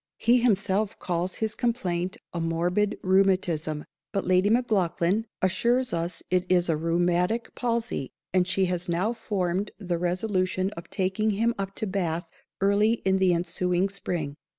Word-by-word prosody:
He 240 +1 +4
_himself 205 -2 +1
_calls 180 +1 -2
his 220 -1 -1
complaint 190 -8 -1 0.2
a 170 - -2
morbid 175 +5 0
rheumatism; 185 -5 +2 0.3
but 195 - -1
Lady 185 +2 +3
Maclaughlan 210 -3 +1 0.2
assures 240 +7 +2
us 170 +1 -2
it 180 -1 +3
is 175 -1 +3
a 165 - +3
rheumatic 175 +7 0
palsy, 235 - -2 0.2
and 180 -1 +3
she 190 0 +2
has 180 -1 -2
now 185 +7 +1
formed 195 -3 -1
the 180 -4 -2
resolution 185 +1 0
of 170 -4 -10
taking 195 +3 0
him 230 +2 +2
up 195 0 -4
to - - -2
Bath 175 -4 -2 0.3
early 200 +3 +4
in 190 0 +3
the 190 -1 +4
ensuing 180 +2 0
_spring. 175 -7 -3
185 Hz, 150 wpm, -26 LUFS, 175-210 Hz, 0.3 s, He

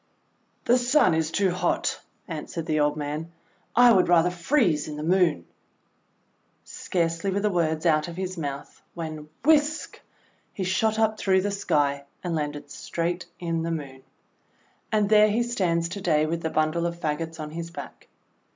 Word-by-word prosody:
:The 245 +2 +4
Sun 245 - +4
is 160 -1 0
too 190 +2 +1
hot," 180 - -1 0.3
answered 165 -2 -5
the 155 -1 0
old 150 0 +2
man. 150 +3 -4 0.4
"I 245 +1 +7
would 185 -3 +4
rather 175 0 +4
freeze 175 - +1
in 150 -1 -6
the 150 - -5
Moon." 170 - +2 1.2
Scarcely 165 +1 -2
were 195 +1 0
the 210 0 +1
words 160 -2 0
out 155 -1 +3
of 170 0 -8
his 185 0 -3
mouth 140 -4 -6
when 155 -3 -6 0.2
whisk 310 0 +2 0.5
he 195 - -3
shot 215 +4 +1
up 220 -1 +1
through 190 -1 +3
the 205 +2 -1
Sky, 140 -7 0 0.2
and 175 -2 -2
landed 145 -2 -4
straight 175 +4 -3
in 165 -2 -2
the 165 - -2
Moon. 140 -5 -5 0.9
And 210 -2 +2
there 215 0 +6
he 225 +3 +1
stands 180 -8 0
to 195 +3 -6
day 155 -4 +2
with 165 +1 -2
the 160 - -1
bundle 155 +2 +1
of 170 0 -6
fagots 160 +1 -3
on 150 -1 -6
his 165 +1 -5
back. 170 - -10
170 Hz, 170 wpm, -25 LUFS, 155-195 Hz, 1.2 s, I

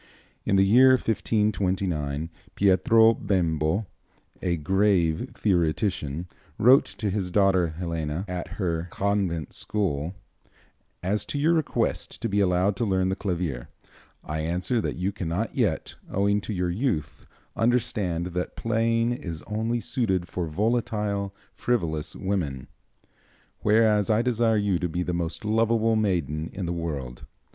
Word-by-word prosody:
In 100 - +2
the 95 0 +5
year 130 +6 +7
1529, 95 - 0 0.2
Pietro 110 +4 +5
Bembo, 90 -1 0 0.6
a 90 -2 0
grave 95 - +2
theoretician, 85 -3 0 0.3
wrote 130 +5 +6
to 105 -3 -3
his 95 -2 -1
daughter 95 -2 +3
Helena, 85 0 -3
at 90 -2 -4
her 85 -3 -1
convent 95 -6 -1
school: 90 -5 -1 0.9
"As 100 +3 0
to - - -4
your 155 +4 +3
request 160 -3 -1
to - - +1
be 100 -1 0
allowed 95 +1 +2
to - - -1
learn 95 -3 +1
the 95 - 0
clavier, 85 - -3 0.5
I 75 +1 -4
answer 90 +8 0
that - - -2
you 90 +3 -1
cannot 95 +2 -3
yet, 105 -11 0 0.2
owing 100 +1 +2
to 110 - -6
your 90 -2 -1
youth, 100 - -2 0.3
understand 100 -7 0
that 90 0 -3
playing 115 +1 +1
is 85 -10 -5
only 110 +5 -1
suited 95 -8 -1
for 85 0 -3
volatile, 105 +1 -1 0.2
frivolous 85 -10 -1
women; 80 -10 -3 0.9
whereas 105 -1 +3
I 110 +1 +3
desire 115 -2 +2
you 100 -4 +1
to 90 - -1
be 90 +3 -2
the 90 - -2
most 85 +3 -3
lovable 115 +1 +2
maiden 85 -7 0
in 95 - -4
the 85 - -2
world. 70 -8 -5
95 Hz, 135 wpm, -26 LUFS, 85-110 Hz, 0.9 s, year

